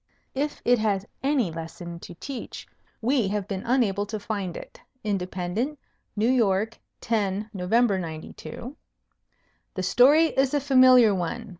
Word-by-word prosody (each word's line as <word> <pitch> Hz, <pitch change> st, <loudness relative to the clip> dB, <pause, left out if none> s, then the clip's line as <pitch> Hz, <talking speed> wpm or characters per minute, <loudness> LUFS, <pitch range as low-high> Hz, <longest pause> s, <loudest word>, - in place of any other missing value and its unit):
"If 290 Hz, +3 st, -3 dB
it 245 Hz, -1 st, +4 dB
has 205 Hz, -3 st, 0 dB, 0.2 s
any 270 Hz, -, +1 dB
lesson 165 Hz, +1 st, -7 dB
to 175 Hz, -, -10 dB
teach, 265 Hz, +7 st, -7 dB, 0.4 s
we 245 Hz, -3 st, +2 dB
have 205 Hz, 0 st, -2 dB
been 195 Hz, -2 st, -3 dB
unable 210 Hz, -5 st, +1 dB
to 215 Hz, +1 st, -4 dB
find 200 Hz, -4 st, -4 dB
it." -, -, -11 dB, 0.2 s
Independent, 195 Hz, +6 st, -2 dB, 0.4 s
New 215 Hz, +2 st, +1 dB
York, 225 Hz, -3 st, +1 dB, 0.2 s
10 210 Hz, -1 st, -1 dB
Nov. 180 Hz, -2 st, -5 dB
'92. 195 Hz, -, -1 dB, 1.0 s
"The 185 Hz, -, -2 dB
story 285 Hz, -, +5 dB
is 270 Hz, +1 st, +1 dB
a -, -, +3 dB
familiar 255 Hz, -5 st, +6 dB
one." 195 Hz, +5 st, -3 dB
215 Hz, 135 wpm, -25 LUFS, 190-250 Hz, 1.0 s, familiar